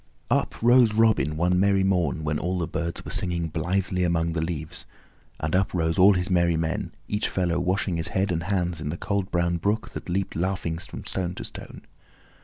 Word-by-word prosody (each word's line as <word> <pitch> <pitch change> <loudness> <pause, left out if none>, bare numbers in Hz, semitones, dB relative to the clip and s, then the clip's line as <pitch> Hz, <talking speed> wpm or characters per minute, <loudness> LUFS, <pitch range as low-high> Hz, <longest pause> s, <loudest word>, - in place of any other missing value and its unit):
Up - - +1
rose 120 -2 +5
Robin 110 -11 +4
Hood 75 0 -4
one 90 +2 +2
merry 100 0 +3
morn 90 -4 +1
when 75 0 -1
all 90 +2 -1
the 85 - -1
birds 85 +2 -4
were - - -6
singing 85 -2 -1
blithely 90 +3 -1
among 85 -1 +1
the 80 - -1
leaves, 80 -2 -5 0.5
and 75 +3 -1
up 95 0 +1
rose 80 +1 0
all 100 +2 +8
his 90 -1 0
merry 85 -3 +2
men, 80 0 -2 0.2
each 105 0 -1
fellow 90 -2 0
washing 90 0 0
his 80 - -2
head 95 +1 0
and 80 -1 -1
hands 90 -4 -1
in 75 - -3
the 85 - -3
cold 100 -1 -2
brown 85 0 +1
brook 100 +6 -1
that - - -7
leaped 95 +2 -1
laughing 85 -2 -1
from 85 - -8
stone 90 -2 -3
to - - -6
stone. - - -9
90 Hz, 210 wpm, -25 LUFS, 85-95 Hz, 0.5 s, all